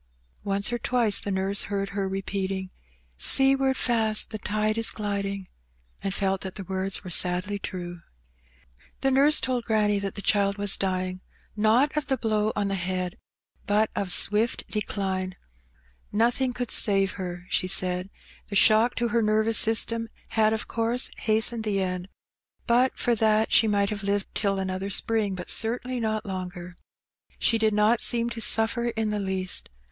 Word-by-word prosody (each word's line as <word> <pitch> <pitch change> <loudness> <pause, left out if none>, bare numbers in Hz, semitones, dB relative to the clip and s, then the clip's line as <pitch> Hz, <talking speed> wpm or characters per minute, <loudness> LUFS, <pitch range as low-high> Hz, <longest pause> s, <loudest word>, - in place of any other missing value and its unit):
Once 200 +3 0
or 240 - -1
twice 230 -3 +1
the - - -6
nurse 195 +1 -1
heard 195 -1 -2
her 195 -1 -3
repeating, 190 -1 -3 0.3
'' - - -38 0.2
Seaward 270 0 +3
fast 225 -3 +1
the 215 - -5
tide 215 +1 -1
is 225 0 +1
gliding," 200 -2 -4 0.5
and 195 - -2
felt 195 -1 -1
that 190 -1 -6
the 200 - -6
words 190 +1 -4
were 185 - -8
sadly 180 +4 +1
true. 175 -3 -6 1.0
The 270 - +2
nurse 280 +3 +5
told 250 -2 -1
granny 210 -2 +1
that 200 -1 -4
the 200 - -4
child 200 -1 +2
was 205 -1 +2
dying, 185 -1 -2 0.3
not 225 +8 +2
of 300 -2 -1
the 265 - 0
blow 215 -2 0
on 205 -1 0
the 195 - -2
head, 185 -1 -3 0.5
but 210 +1 +2
of 195 -3 -2
swift 210 +5 +1
decline. 190 -3 -3 0.8
Nothing 240 +4 +1
could 245 -1 -5
save 195 -2 +3
her, 180 -2 -6
she 185 - +1
said. 185 0 0 0.4
The 205 - -6
shock 220 +4 +5
to 235 0 -1
her 235 0 +1
nervous 215 +1 +2
system 230 +1 +2 0.2
had 215 -1 +2
of 220 - -2
course 230 +2 0
hastened 220 +1 +1
the 205 -2 0
end; 185 -1 -3 0.6
but 245 +2 +2
for 240 - +1
that 220 0 +2
she 225 - +5
might 200 -1 +1
have 205 -1 -3
lived 200 0 -2
till 200 -2 0
another 190 0 -3
spring, 210 -1 +1
but 180 -1 -3
certainly 245 +3 +1
not 220 -1 -2
longer. 180 -2 -6 0.6
She 225 - +3
did 220 -1 +2
not 215 +3 +3
seem 235 0 +3
to 235 - -5
suflFer 230 +2 +3
in 220 -1 -1
the 210 - -1
least. 190 -1 -3
205 Hz, 170 wpm, -26 LUFS, 190-225 Hz, 1.0 s, nurse